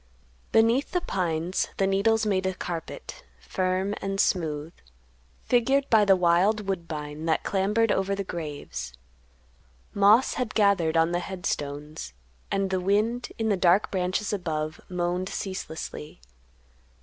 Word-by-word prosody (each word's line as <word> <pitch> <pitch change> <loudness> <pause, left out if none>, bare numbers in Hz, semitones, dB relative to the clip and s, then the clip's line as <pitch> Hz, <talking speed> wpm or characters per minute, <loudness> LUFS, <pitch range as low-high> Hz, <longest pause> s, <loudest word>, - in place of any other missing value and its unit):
Beneath 230 +7 +3
the 360 - +1
pines 175 - -1
the 195 - +2
needles 215 +3 +2
made 190 -2 +1
a 190 - -2
carpet, 170 -2 -6 0.2
firm 185 - -1
and 195 0 -3
smooth, 160 -4 0 0.7
figured 270 +3 +2
by 220 -2 +6
the 195 -1 +6
wild 185 +4 +2
woodbine 160 -4 -4
that 160 - +1
clambered 205 +3 +1
over 195 +1 +1
the 200 - -3
graves; 145 - -6 1.0
moss 205 +5 +5
had 245 -4 -3
gathered 195 -7 +3
on 165 +1 +3
the 175 - +1
head 180 0 -7
stones, 145 - -4 0.4
and 195 -1 0
the 185 -1 0
wind, 215 +6 0
in 225 -1 0
the 205 - +3
dark 185 +2 +3
branches 185 +3 -1
above, 155 -5 -3
moaned 180 +1 -1
ceaselessly. 160 -5 -6
190 Hz, 135 wpm, -26 LUFS, 165-205 Hz, 1.0 s, by